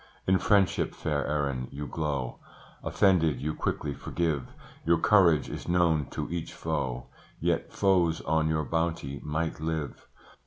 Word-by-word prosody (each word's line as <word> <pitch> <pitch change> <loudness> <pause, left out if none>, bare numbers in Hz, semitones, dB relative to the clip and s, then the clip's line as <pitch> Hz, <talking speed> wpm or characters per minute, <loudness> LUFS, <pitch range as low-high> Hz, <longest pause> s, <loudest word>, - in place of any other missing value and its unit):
In 95 0 +3
friendship, 100 -3 +2
fair 75 -2 -1
Erin, 70 -4 -1
you 75 +1 -6
glow; 70 -3 -3 0.4
Offended, 80 -9 +3
you 75 +3 -2
quickly 75 -2 -2
forgive; 80 -3 -2 0.4
Your 85 +1 +4
courage 90 -8 +4
is - - -7
known 85 -5 +3
to - - -4
each 85 -2 -4
foe, 65 -1 -2 0.3
Yet - - 0
foes 90 -4 +2
on 80 +1 +1
your 80 -1 0
bounty 80 -3 -2
might 80 +2 -2
live. 80 -2 -4
80 Hz, 140 wpm, -28 LUFS, 70-85 Hz, 0.4 s, Your